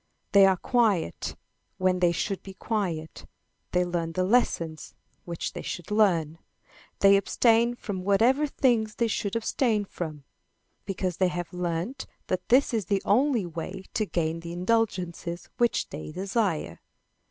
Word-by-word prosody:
They 200 -1 +7
are 190 -1 +3
quiet 210 - 0 0.4
when 185 -1 +2
they 175 -1 +4
should 195 +3 -2
be 195 -1 -11
quiet, 175 -9 -3 0.4
they 180 0 +2
learn 170 -2 -2
the 185 - 0
lessons 170 -7 0 0.3
which 170 -1 -4
they - - -5
should 175 +2 -6
learn, 170 -7 +2 0.6
they 195 0 +7
abstain 230 +4 +3
from 195 -6 -5
whatever 235 +10 +3
things 230 -6 +1
they 235 - +1
should 205 -1 -2
abstain 225 -2 +1
from, 155 -6 -6 0.6
because 185 -3 -2
they 185 - +3
have 175 0 -4
learned 180 +9 -3 0.2
that 185 -1 -2
this 255 +1 +4
is 220 -5 0
the 195 +1 0
only 245 -1 +3
way 175 +3 -6
to 215 - 0
gain 165 -2 -1
the 170 0 -7
indulgences 180 -3 -1
which 240 -1 +2
they 155 +1 -7
desire. 190 0 -1
190 Hz, 145 wpm, -27 LUFS, 175-220 Hz, 0.6 s, They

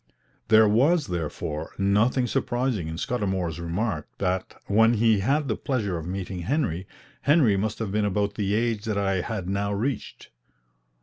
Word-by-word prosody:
There 110 0 +6
was, 140 +10 +3
therefore, 80 -2 -4
nothing 105 +6 +2
surprising 120 -6 -1
in 80 0 -5
Scudamour's 95 -6 -2
remark, 85 -1 -2
that, 95 -1 -2
when 115 +3 +4
he 110 -1 +3
had 140 +8 +1
the 110 - 0
pleasure 110 -9 -2
of 80 0 -5
meeting 95 0 -4
Henry, 95 - -1 0.3
Henry 140 -8 +4
must 105 +2 -1
have 110 -4 -3
been 105 +1 +1
about 100 0 0
the 105 -1 -1
age 115 -2 0
that 110 -2 -1
I 95 -2 +1
had 100 -2 -4
now 100 +1 -1
reached. 110 +4 -3
105 Hz, 160 wpm, -25 LUFS, 95-115 Hz, 0.3 s, There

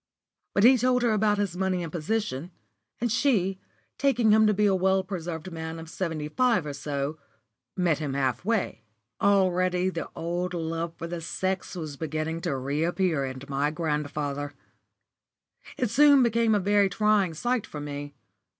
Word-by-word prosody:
But 200 - +3
he 255 +2 +7
told 250 +1 +2
her 235 - +3
about 210 -1 +2
his 200 -4 -1
money 185 -1 0
and 165 - -6
position, 175 -3 -2 0.5
and 240 -1 0
she, 195 -8 +1 0.4
taking 245 -6 +3
him 220 0 +6
to - - +4
be 210 +1 +2
a 200 - +4
well 190 +1 +2
preserved 175 -2 -5
man 160 0 -5
of 160 0 -9
seventy 160 -5 -3
five 230 +1 +2
or 145 - -4
so, 140 +1 -3 0.6
met 175 -5 +2
him 145 -3 -3
half 135 0 0
way. 210 - -1 0.4
Already 185 -2 +3
the 170 - -5
old 175 +2 -2
love 165 0 -3
for 165 - -5
the 170 0 -5
sex 185 +3 -3
was 155 -5 -6
beginning 160 +2 -3
to 170 -6 -1
reappear 155 +4 0
in 130 0 -6
my 140 +1 0
grandfather. 150 -2 -3 1.2
It 245 -4 0
soon 285 +1 +6
became 230 -1 +3
a - - +3
very 200 0 +3
trying 205 -3 +2
sight 240 +5 -1
for 150 - -7
me. 145 0 -6
175 Hz, 165 wpm, -27 LUFS, 155-205 Hz, 1.2 s, he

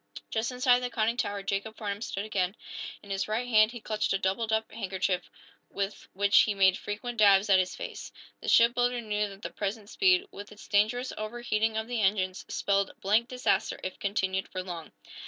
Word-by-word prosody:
Just 225 +3 -1
inside 250 0 +4
the 250 0 -3
conning 230 0 0
tower 205 -4 -2
Jacob 200 +3 -3
Farnum 205 -2 -4
stood 200 -3 -3
again. 195 -2 -1 0.5
In 200 - -10
his 195 0 -1
right 225 +4 -1
hand 215 -2 +5
he 240 - -7
clutched 215 -1 -1
a - - +2
doubled 195 +4 -1
up 220 0 0
handkerchief, 190 -4 -2 0.4
with 200 +1 -4
which 200 +1 +4
he 210 - +3
made 190 -1 +5
frequent 225 +4 -5
dabs 200 -1 +6
at 190 - +7
his 185 0 -1
face. - - -7 0.3
The - - -9
shipbuilder 245 +1 +4
knew 210 -2 -1
that 195 +1 -13
the - - -4
present 205 +1 -4
speed, 375 -1 +3
with 205 +1 -10
its 210 - -13
dangerous 220 +5 +1
overheating 220 0 -1
of 220 - -1
the 240 -2 -1
engines, 190 -2 0
spelled 200 -1 0
blank 215 +4 +2
disaster 250 0 0
if 185 - -5
continued 190 -1 -1
for 185 -1 -5
long. 170 -4 -7
210 Hz, 190 wpm, -29 LUFS, 195-230 Hz, 0.5 s, at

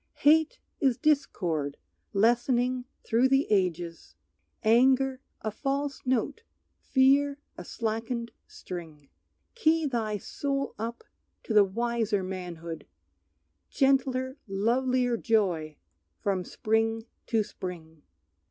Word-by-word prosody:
"Hate 315 +1 +5 0.2
is 265 -6 +2
discord 175 - 0 0.3
lessening 240 +4 +2 0.2
through 235 +3 +3
the 270 +2 +3
ages; 170 - -1 0.5
Anger 260 +3 +4 0.2
a 215 - -2
false 275 +4 -2
note, 260 - 0 0.4
fear 275 +1 +3 0.2
a - - -8
slackened 230 +3 -3 0.2
string. 160 -6 -9 0.4
Key 325 -8 +2
thy 225 -6 -1
soul 275 +6 -3
up 230 +2 -4 0.4
to 225 - -3
the 210 -1 +8
wiser 225 0 0
manhood, 175 -3 -6 0.8
Gentler 265 -1 +1
lovelier 245 +4 +1
joy 180 -10 0 0.4
from 190 -3 -1
spring 225 +1 0 0.2
to 225 -3 +2
spring!" 165 -6 -8
230 Hz, 95 wpm, -28 LUFS, 190-265 Hz, 0.8 s, the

